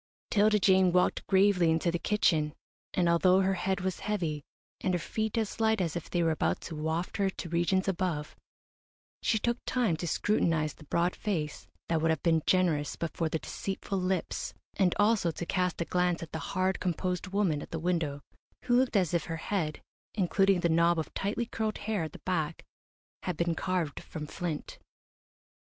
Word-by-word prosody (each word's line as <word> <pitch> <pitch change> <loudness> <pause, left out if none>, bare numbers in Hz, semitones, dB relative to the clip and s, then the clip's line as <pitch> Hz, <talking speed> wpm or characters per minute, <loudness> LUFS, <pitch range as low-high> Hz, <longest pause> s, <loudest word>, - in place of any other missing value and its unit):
'Tilda 210 0 +4
Jane 190 -2 +4
walked 180 +1 +2
gravely 190 -3 +4
into 160 +2 +2
the 175 - -1
kitchen, 160 -8 +1 0.4
and 180 -2 +3
although 180 +3 +5
her 190 0 +2
head 190 0 -1
was 185 -1 -2
heavy, 170 -8 -2 0.4
and 185 -1 0
her - - 0
feet 220 +6 -2
as 220 -1 -2
light 220 -1 +3
as 170 -4 -1
if 170 - -5
they 175 -1 +1
were 165 - +3
about 155 - 0
to 165 - -7
waft 160 +3 -2
her 195 -1 +2
to 180 -2 -7
regions 175 +3 +1
above, 175 -5 -1 0.9
she 220 - +2
took 235 +3 0
time 240 -10 +2
to 175 - -4
scrutinise 160 -4 +1
the 150 - -16
broad 170 +4 +1
face 160 -8 -3 0.2
that 165 -2 +1
would 165 - +2
have 160 - 0
been 165 -2 +3
generous 170 -6 +2
but 165 - -4
for 165 -2 0
the 160 - 0
deceitful 195 +3 -4
lips, 185 -1 -2 0.2
and 185 -3 +2
also 205 -4 +3
to 170 +1 -4
cast 180 0 0
a - - 0
glance 180 0 +1
at 160 - -9
the 160 - -3 0.2
hard, 185 +1 +1
composed 180 +1 -2
woman 185 -6 +1
at - - -9
the 165 - -3
window, 160 -4 -1 0.4
who 245 -1 +2
looked 255 -1 +2
as 180 -5 +2
if 170 -3 +1
her 165 -1 -4
head, 160 -3 -2 0.3
including 195 -1 +3
the 170 - +3
knob 170 +1 +3
of 160 - -3
tightly 210 +4 -1
curled 220 -2 -2
hair 210 -2 -2
at 160 -2 -3
the - - -10
back, 165 -4 -1 0.6
had 180 -4 -3
been 170 0 +1
carved 170 -3 -1
from 155 -2 -7
flint. 160 -1 -5
180 Hz, 190 wpm, -30 LUFS, 165-195 Hz, 0.9 s, although